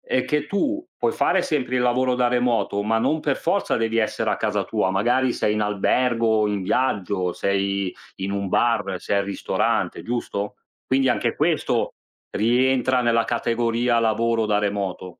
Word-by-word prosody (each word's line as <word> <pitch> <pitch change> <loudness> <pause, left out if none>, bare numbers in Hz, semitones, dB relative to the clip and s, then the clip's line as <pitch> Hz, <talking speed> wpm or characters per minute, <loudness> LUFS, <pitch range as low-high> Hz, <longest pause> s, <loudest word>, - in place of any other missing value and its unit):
è 130 - -1
che 150 0 -1
tu 305 - -1
puoi - - 0
fare - - +2
sempre 130 -4 -1
il - - +1
lavoro 125 +1 +2
da 125 0 +2
remoto, 120 -4 0
ma 110 +2 +1
non 155 +7 0
per 145 -2 0
forza 195 +4 0
devi 115 0 -1
essere 110 - 0
a - - 0
casa - - -1
tua. 95 - 0
Magari 120 +6 +1
sei 105 - 0
in 105 - -1
albergo, 110 +1 +1
in 100 -2 -2
viaggio, 95 -5 0
sei 100 0 -1 0.2
in 95 0 -4
un 100 -1 -2
bar, 100 -3 +1
sei 100 - 0
al 100 - 0
ristorante, 100 - -1
giusto? 110 -4 -3 0.3
Quindi 130 0 +2
anche 120 - 0
questo, - - 0 0.4
rientra 125 +3 +2
nella 115 -1 +2
categoria 120 0 0
lavoro 115 0 +1
da 105 -1 +2
remoto. 100 -3 -3
115 Hz, 165 wpm, -23 LUFS, 100-125 Hz, 0.4 s, fare